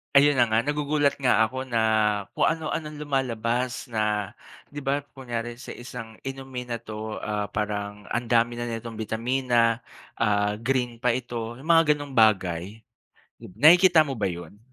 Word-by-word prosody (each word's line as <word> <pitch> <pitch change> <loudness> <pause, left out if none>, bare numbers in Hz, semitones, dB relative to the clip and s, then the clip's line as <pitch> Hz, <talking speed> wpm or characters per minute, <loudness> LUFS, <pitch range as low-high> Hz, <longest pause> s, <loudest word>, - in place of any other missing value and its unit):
Ayun 140 -1 +6
na 120 - +5
nga 110 +1 +2
nagugulat 145 0 0
nga 125 -4 +4
ako 130 +3 -3
na 115 -2 +1 0.5
kung - - +2
ano-ano 160 -1 -2
lumalabas 125 -3 -2
na 105 -2 0 0.4
'di 145 - -6
ba, 140 +1 -1
kunyari 120 -2 -5
sa 130 - -8
isang 120 -3 -9
inumin 135 -2 -6
na 115 - -2
to, 110 -1 -6
ah, 105 -1 -3
parang 105 -1 -3
ang 120 +1 -1
dami 120 0 +2
na 120 - -4
nitong 115 0 -5
bitamina, 115 +1 +1 0.3
ah, 105 -1 +1
green 125 +1 -1
pa 125 -2 +3
ito, 120 -1 -4
'yung 155 - -11
mga 165 -2 +5
ganong 145 -2 -8
bagay. 100 -2 +2 0.6
Dib - - -12
nakikita 175 +2 +7
mo 135 -5 -2
ba 105 - 0
'yun? 85 +1 -5
120 Hz, 160 wpm, -25 LUFS, 110-135 Hz, 0.6 s, nakikita